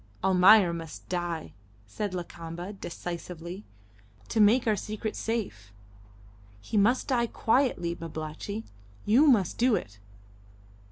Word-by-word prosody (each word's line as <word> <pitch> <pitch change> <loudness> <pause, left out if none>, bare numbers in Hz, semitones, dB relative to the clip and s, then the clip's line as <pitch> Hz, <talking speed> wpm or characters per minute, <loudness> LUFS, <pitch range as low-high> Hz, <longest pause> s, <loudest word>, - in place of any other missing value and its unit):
"Almayer 190 0 +6
must 165 -2 -8
die," 175 -3 -3 0.3
said 185 - -4
Lakamba, 175 +2 -6
decisively, 175 0 -7 0.6
"to 225 - -1
make 220 +4 +5
our 220 -2 +3
secret 215 +2 -4
safe. 190 - -4 0.9
He 100 - -7
must 220 +5 +3
die 240 -3 +2
quietly, 225 -9 +1
Babalatchi. 165 +6 -6 0.4
You 255 +9 +5
must 210 - +3
do 245 -1 +4
it." 105 - -6
190 Hz, 110 wpm, -28 LUFS, 170-220 Hz, 0.9 s, Almayer